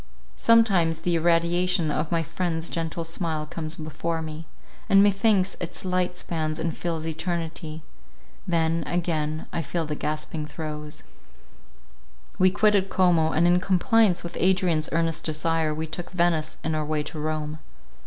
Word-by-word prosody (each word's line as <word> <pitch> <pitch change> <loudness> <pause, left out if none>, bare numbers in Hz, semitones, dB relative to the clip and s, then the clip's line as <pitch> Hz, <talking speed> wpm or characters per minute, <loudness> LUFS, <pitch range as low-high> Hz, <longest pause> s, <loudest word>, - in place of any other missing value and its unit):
Sometimes 190 -9 +3
the 175 +1 0
irradiation 170 0 +2
of 155 - -2
my 165 -1 +1
friend's 165 0 -2
gentle 165 0 -3
smile 165 -2 -2
comes 155 +1 -5
before 160 +1 -3
me; 160 0 -7 0.4
and 195 0 +7
methinks 200 -1 +3
its 175 +2 -4
light 180 -1 0
spans 155 -3 -3
and 165 0 -2
fills 165 -2 -3
eternity—then, 165 0 -3
again, 155 -3 -1
I 170 - 0
feel 165 0 -2
the 150 - -3
gasping 155 +1 -3
throes— 150 -1 -7 1.4
We 185 - +6
quitted 200 0 +2
Como, 170 -4 +3
and 165 +3 +2
in 175 +1 +5
compliance 195 +1 +3
with 170 - -6
Adrian's 180 -4 +2
earnest 165 -1 0
desire, 160 0 0
we 155 +1 -3
took 170 +2 -6
Venice 170 -3 0
in 160 - -1
our 155 0 0
way 150 0 -1
to 155 +1 -7
Rome. 155 0 -3
165 Hz, 145 wpm, -25 LUFS, 155-180 Hz, 1.4 s, and